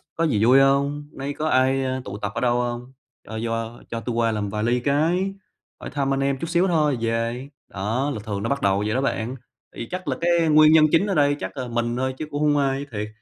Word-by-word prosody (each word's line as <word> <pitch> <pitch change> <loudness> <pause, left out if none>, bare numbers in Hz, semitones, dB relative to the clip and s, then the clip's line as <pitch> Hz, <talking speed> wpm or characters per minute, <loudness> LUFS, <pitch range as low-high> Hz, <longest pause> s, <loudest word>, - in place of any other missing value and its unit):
có 165 - -1
gì 110 -9 +1
vui 130 +3 +6
hông? 140 +1 +3 0.2
Hôm - - -19
nay 140 +1 -4
có 155 +2 -3
ai, 135 -1 +2
ơ, 130 0 -2
tụ 100 +1 -6
tập 105 -1 -4
ở - - -2
đâu 120 -1 +2
hông? 120 +2 -5 0.3
Cho 110 - -6
cho 115 0 -3
cho 115 - -3
tui 120 0 -4
qua 115 -1 +2
làm 105 -2 -2
vài 105 +1 -3
ly 120 +2 +1
cái, 165 +8 +1 0.5
hỏi - - -7
thăm 140 -1 -1
anh 135 - -1
em 135 0 0
chút 165 - -5
xíu 175 +2 +2
thôi 155 -5 +2
rồi - - -2
về." 115 +4 -2 0.2
Đó, 115 +9 -2
là 110 - -5
thường 100 -2 -4
nó 115 - -1
bắt 140 0 -1
đầu 100 +1 +2
vậy 105 - -1
đó 130 - +1
bạn, 125 -2 -2 0.4
thì 115 - -6
chắc 185 -1 -5
là 130 -2 -1
cái 170 -1 +3
nguyên 155 +1 +6
nhân 155 -1 +7
chính 170 +5 +3
ở 195 - 0
đây 145 -1 +3
chắc - - -6
là 130 -2 -3
mình 120 0 -1
thôi 130 0 -1
chứ 155 - -4
cũng 145 +1 -3
hông 150 -1 +3
ai, 140 0 0
thiệt. 105 0 -4
130 Hz, 270 wpm, -23 LUFS, 115-145 Hz, 0.5 s, nhân